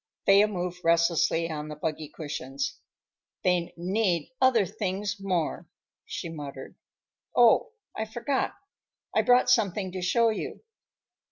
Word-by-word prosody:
Thea 200 +2 +6
moved 180 -3 -4
restlessly 165 0 +3
on 150 -1 -4
the 150 - -6
buggy 155 0 -4
cushions. 140 -3 -5 0.6
"They 180 -2 +1
need 180 - 0
other 250 -6 +5
things 195 +2 -3
more," 185 -5 -2 0.4
she - - -5
muttered. 145 -4 -8 0.6
"Oh, 475 - +5 0.2
I 220 - -2
forgot. 240 +5 -2 0.6
I - - +5
brought 250 0 +4
something 195 -3 +1
to 185 0 -5
show 230 +6 +3
you. 220 - -4
180 Hz, 120 wpm, -27 LUFS, 165-210 Hz, 0.6 s, Thea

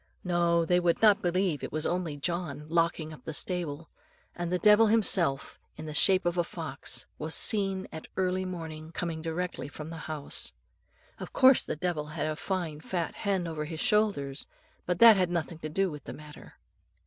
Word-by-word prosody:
No, 170 -2 +2
they 180 +2 +3
would 175 -1 +1
not 210 -2 +5
believe 180 -3 0
it - - -5
was 155 +1 -2
only 175 -4 -2
John 155 -1 -3
locking 165 -1 0
up 155 - -14
the 160 - -5
stable; 165 -4 -3 0.4
and 175 0 -4
the 180 - +2
devil 210 +3 +6
himself, 190 -10 +2 0.2
in 155 - -8
the 155 - -6
shape 185 +4 +6
of 175 0 0
a - - +3
fox, 160 -5 -6
was 155 +1 -2
seen 195 -3 +2
at 160 - -8
early 185 0 0
morning 160 -3 -7
coming 165 -3 -3
directly 165 -3 -4
from 155 +2 -9
the 165 - -7
house. 150 -2 -3 0.7
Of - - -8
course 260 -1 +6
the - - -4
devil 155 -2 -2
had 155 -1 -4
a 155 0 -2
fine 170 -4 -3
fat 170 -2 -3
hen 195 -4 -1
over 160 -2 -4
his 160 0 -6
shoulders, 160 -12 +1 0.4
but 180 -1 0
that 230 -1 +8
had 180 -2 +1
nothing 170 -2 -3
to 155 - -5
do 190 +3 0
with 150 -1 -9
the - - -7
matter. 150 0 -13
170 Hz, 190 wpm, -29 LUFS, 155-185 Hz, 0.7 s, that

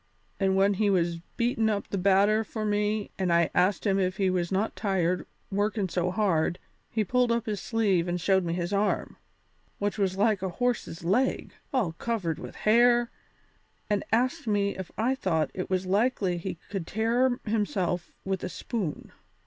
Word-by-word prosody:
And 190 -1 +2
when 195 +1 +4
he 205 +1 +1
was 170 -3 +1 0.2
beatin' 235 -2 +1
up 205 -2 -1
that 200 - -2
batter 200 +3 +4
for 220 0 -5
me 210 0 0
and 185 -2 +1
I 170 -1 +3
asked 185 +3 +2
him 195 -1 +2
if 185 0 0
he 190 -2 +2
was 175 -1 -1
not 200 +4 0
tired 185 -4 0 0.2
workin' 205 0 0
so 180 +1 0
hard, 180 -4 +1 0.3
he 220 - 0
pulled 250 +3 +2
up 235 -1 0
his 210 -3 -3
sleeve 200 -7 +1
and 175 0 -1
showed 190 +2 +2
me 170 -1 -2
his 175 +2 -2
arm, 205 +1 0 0.6
which 205 +1 -2
was 190 -1 0
like 210 -1 +2
a 190 - -1
horse's 245 -9 -1
leg, 230 +10 +1 0.2
all 245 - +1
covered 170 -3 -2
with - - -8
hair, 240 +2 +4 0.8
and 205 - +1
asked 255 +6 +1
me 200 -1 +1
if 190 -2 -6
I 235 +4 +2
thought 180 - 0
it 185 - -4
was 185 0 0
likely 195 -2 +1
he 190 +2 -4 0.2
could 190 -5 -3
tear 240 +4 +1
himself 195 -5 -1
with 190 -1 -2
a - - -2
spoon. 185 -1 -4
200 Hz, 180 wpm, -28 LUFS, 185-220 Hz, 0.8 s, when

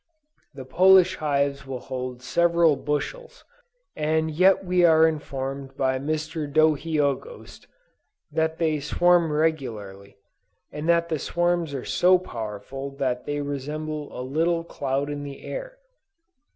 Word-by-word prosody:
The 135 -2 -8
Polish 185 +4 +5
hives 140 -2 -1
will 135 -1 -4
hold 125 -1 -6
several 170 +3 +3
bushels, 475 - -4 0.5
and 160 +1 0
yet 190 +4 +3
we 180 0 +2
are 160 -1 +6
informed 135 -3 -5
by 130 -1 +1
Mr. 155 +1 -3
Dohiogost, 155 - 0 0.6
that 160 +1 0
they 155 -2 0
swarm 170 +3 +3
regularly, 110 -11 -2 0.5
and 150 +3 -4
that 170 0 +3
the 160 -3 -1
swarms 175 -3 0
are 130 - -5
so 185 +1 +4
powerful 120 - -6
that 125 -3 -2
"they 145 0 -2
resemble 150 +1 -5
a - - -3
little 165 +5 0
cloud 140 -3 -2
in 145 0 -4
the 140 -1 -9
air." - - -6
150 Hz, 125 wpm, -25 LUFS, 135-170 Hz, 0.6 s, are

